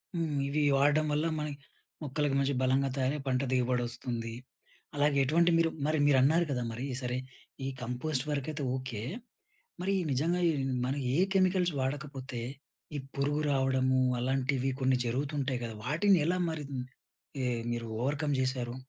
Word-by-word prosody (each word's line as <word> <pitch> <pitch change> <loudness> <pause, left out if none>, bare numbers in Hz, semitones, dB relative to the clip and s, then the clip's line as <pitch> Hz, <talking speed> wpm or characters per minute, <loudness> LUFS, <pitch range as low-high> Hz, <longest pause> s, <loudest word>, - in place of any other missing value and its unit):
హ్మ్. 160 -4 -1
ఇవి 145 +2 0 0.2
వాడడం 145 +2 +4
వల్ల 150 +2 +1
మన 150 - -2 0.6
మొక్కలకి 145 0 0
మంచి 140 +1 +1
బలంగా 135 +1 +2
తయారై 135 +2 +1
పంట 130 -1 +2
దిగుబడి 125 -1 +2
వస్తుంది. 120 -1 -3 0.6
అలాగే 145 0 +2
ఎటువంటి 170 +5 +3
మీరు 165 0 +3 0.2
మరి 155 +1 +2
మీరన్నారు 145 +5 +4
కదా! 125 -3 -1
మరి 120 +4 -4 0.2
సరే, 125 0 -2 0.5
ఈ - - -1
కంపోస్ట్ 125 +3 0
వరకైతే 150 +1 -2
ఓకె. 130 -5 -4 0.8
మరి 195 +2 +1 0.2
నిజంగా 165 +7 +1
ఈ - - +1 0.3
మనం 135 +3 -1 0.2
ఏ - - +2 0.2
కెమికల్స్ 185 -2 +3
వాడకపోతే 135 -2 -3 0.6
ఈ - - -2 0.2
పురుగు 145 +2 0
రావడము 130 -1 +2 0.2
అలాంటివి 130 +1 0
కొన్ని 130 -1 +3
జరుగుతుంటాయి 135 +1 -1
కదా! 115 -1 -5
వాటిని 190 +5 +4
ఎలా 180 +2 +1
మరి 155 -2 -4 0.8
ఏ, - - +1 0.3
మీరు 120 -1 -3
ఓవర్‌కమ్ 145 +3 0
చేశారు? 130 -2 -1
135 Hz, 145 wpm, -31 LUFS, 130-150 Hz, 0.8 s, వాడడం